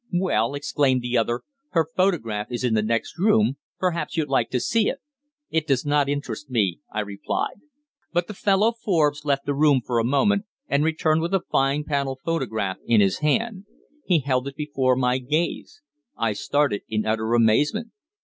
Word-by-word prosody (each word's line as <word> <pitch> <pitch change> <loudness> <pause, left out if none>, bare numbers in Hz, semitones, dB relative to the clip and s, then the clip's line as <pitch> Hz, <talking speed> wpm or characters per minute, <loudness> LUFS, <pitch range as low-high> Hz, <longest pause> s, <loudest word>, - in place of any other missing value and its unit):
"Well," 145 - +1
exclaimed 140 -3 +1
the 120 0 -2
other, 120 +1 +1 0.3
"her 165 -3 +3
photograph 115 - 0
is 120 +1 -3
in 125 -3 +1
the 110 - +3
next 115 +8 -2
room; 210 -6 +3 0.2
perhaps 175 -2 -2
you'd 155 -3 0
like 135 - +1
to 125 - 0
see 225 - +1
it." 275 - -3 0.5
"It 160 -1 0
does 135 -2 +1
not 145 -1 +2
interest 145 0 -4
me," 100 -9 0
I 110 - -1
replied. 100 -1 -3 0.5
But 175 0 +1
the 210 - -7
fellow 200 +3 +2
Forbes 155 -10 0
left 140 -1 0
the 145 - 0
room 145 -1 +4
for 120 -2 0
a - - +1
moment 200 - +2 0.2
and 140 +1 +2
returned 160 0 +1
with 170 +4 0
a 190 - 0
fine 135 +2 +2
panel 140 -3 -1
photograph 110 - -1
in 115 -2 +4
his 100 -2 +2
hand. 200 +6 0 0.4
He 170 -5 +2
held 130 -1 0
it 140 - -6
before 140 -4 +1
my 125 0 +1
gaze. 155 - -2 0.3
I 110 -2 0
started 140 0 0
in 110 0 -1
utter 110 +1 0
amazement. 145 - +2
140 Hz, 180 wpm, -24 LUFS, 120-165 Hz, 0.5 s, room